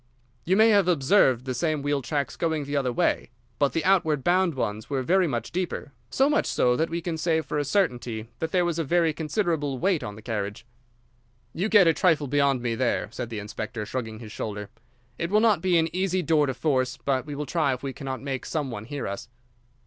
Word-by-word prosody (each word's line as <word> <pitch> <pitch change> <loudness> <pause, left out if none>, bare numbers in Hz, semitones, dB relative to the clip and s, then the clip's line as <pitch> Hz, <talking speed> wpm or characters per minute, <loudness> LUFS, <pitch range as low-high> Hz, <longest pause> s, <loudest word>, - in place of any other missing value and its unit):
"You 185 +3 +2
may 220 +1 +6
have 200 -4 +4
observed 135 - +3
the 130 - -2
same 155 +2 -1
wheel 145 -1 0
tracks 135 -1 -2
going 160 -3 -1
the 145 +1 -4
other 135 -3 +1
way. 120 - 0 0.3
But 140 -1 +2
the 165 - -1
outward 160 -7 +3
bound 180 -2 +2
ones 105 -4 -3
were 135 -2 -1
very 185 +5 +3
much 120 -5 -3
deeper—so 165 - -2
much 300 +1 +2
so 125 0 +2
that 160 +5 0
we 170 +1 -3
can 165 -1 -3
say 160 0 +2
for 150 0 -3
a - - +1
certainty 125 - -1
that 160 0 -2
there 180 -1 +2
was 170 -1 -1
a - - +1
very 165 +1 +2
considerable 155 -4 -1
weight 180 +2 +1
on 105 -1 -6
the 110 - -13
carriage." 105 -1 -4 0.9
"You 195 +6 -1
get 205 -4 +7
a 165 - +5
trifle 160 -4 +2
beyond 140 -2 +1
me 120 -2 0
there," 120 -4 0
said 120 - -5
the 115 - -5
inspector, 105 +1 -5
shrugging 110 -1 -4
his 110 -2 -10
shoulder. 105 -2 -5 0.5
"It 170 - -1
will 210 +2 +4
not 215 -6 +3
be 180 -1 +3
an 165 +1 0
easy 185 -1 0
door 150 -2 +3
to 135 - -2
force, 130 -3 0
but 135 0 -1
we 145 - -5
will 150 +1 -3
try 150 -1 +1
if 130 0 -4
we 135 -1 -3
cannot 135 -1 -5
make 135 -2 -4
some 150 -5 -2
one 110 -2 -6
hear 145 +3 -4
us." 115 +4 -6
145 Hz, 225 wpm, -26 LUFS, 125-170 Hz, 0.9 s, get